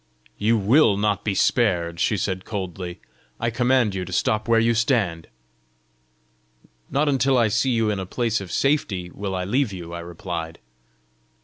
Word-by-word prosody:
"You 115 +2 +3
WILL 110 +1 +4
not 105 -1 0
be 100 -2 -1
spared!" 85 -8 +1
she 105 - +1
said 95 0 -2
coldly. 90 -3 -6 0.4
"I 115 0 0
command 125 -2 +2
you 95 -1 -3
to 90 - -8
stop 110 +4 0
where 115 -1 +4
you 115 +1 +3
stand." 110 - 0 1.6
"Not 145 +3 +1
until 135 -1 +2
I 115 -3 +3
see 130 +5 +1
you 115 -3 +1
in 100 - -2
a 95 - -5
place 115 0 -1
of 95 - -8
safety 100 -11 0
will 95 0 -4
I 90 - -2
leave 125 +4 +1
you," 85 -3 -8
I 85 - -5
replied. 85 -1 -6
105 Hz, 170 wpm, -23 LUFS, 90-115 Hz, 1.6 s, WILL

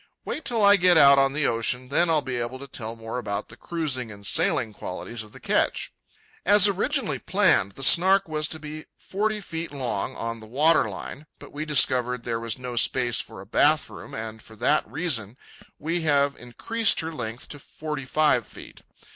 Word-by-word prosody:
Wait 310 - -4
till 225 -4 +1
I 200 0 +7
get 180 -2 +5
out 140 -2 +7
on 135 0 +3
the 150 +1 0
ocean, 125 +2 0
then 170 +5 +2
I'll 155 -3 +2
be 125 -2 -4
able 120 +2 -4
to 140 +1 -10
tell 115 -3 -6
more 115 +2 -6
about 105 -3 -4
the 115 - -12
cruising 130 -6 -3
and 100 -1 -12
sailing 110 +2 +2
qualities 110 +4 -7
of 105 -1 -11
the - - -13
ketch. - - 0 0.5
As 205 +1 +7
originally 220 +6 -1
planned, 175 - +2
the 135 - -7
Snark 190 +6 +5
was 155 -1 -1
to 160 - -5
be 155 +1 -8
forty 215 +2 -2
feet 165 -4 -6
long 125 -8 -3
on 115 0 -5
the 110 - -12
water 150 +8 +3
line. 150 +2 -9
But - - -14
we 150 +2 -4
discovered 125 -4 +2
there 115 -1 -2
was 115 -1 -4
no 125 -1 -7
space 120 0 +2
for - - -11
a - - -12
bath 150 +8 +2
room, - - -10
and 110 0 -7
for 110 - -15
that 150 +8 +1
reason 125 - -1 0.4
we 165 +3 -2
have 140 -3 +2
increased 220 - 0
her 160 0 -5
length 120 -5 -6
to 145 - -9
forty 150 -1 -7
five 145 -4 +2
feet. - - -13
140 Hz, 195 wpm, -25 LUFS, 115-165 Hz, 0.5 s, I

